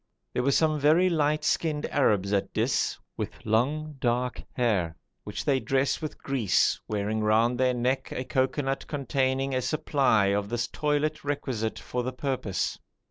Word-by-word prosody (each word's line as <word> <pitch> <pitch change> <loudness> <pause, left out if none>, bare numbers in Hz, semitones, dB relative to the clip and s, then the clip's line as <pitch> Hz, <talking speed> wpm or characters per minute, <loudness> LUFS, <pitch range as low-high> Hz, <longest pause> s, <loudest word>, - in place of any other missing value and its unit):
There - - +1
were 130 - +1
some 155 +1 +2
very 160 +6 +4
light 150 -1 +1
skinned 155 -1 0
Arabs 105 -8 +2
at 100 - 0
Dis, - - +1 0.2
with - - -6
long 145 +7 0
dark 125 0 0
hair, 100 -10 0 0.3
which - - -5
they 140 -3 +3
dress 135 +2 0
with 155 - -5
grease, 115 -10 +1
wearing 105 +1 -1
round 115 +3 +3
their 130 -1 +3
neck 130 +2 -1
a 130 - -3
cocoanut 135 +1 -1
containing 135 -1 0
a 130 - +1
supply 135 -8 +2
of 100 0 -1
this 120 0 -1
toilet 150 +1 -1
requisite 130 -6 -2
for 125 - -3
the 130 +1 -3
purpose. 130 -7 -2
130 Hz, 155 wpm, -27 LUFS, 115-145 Hz, 0.3 s, very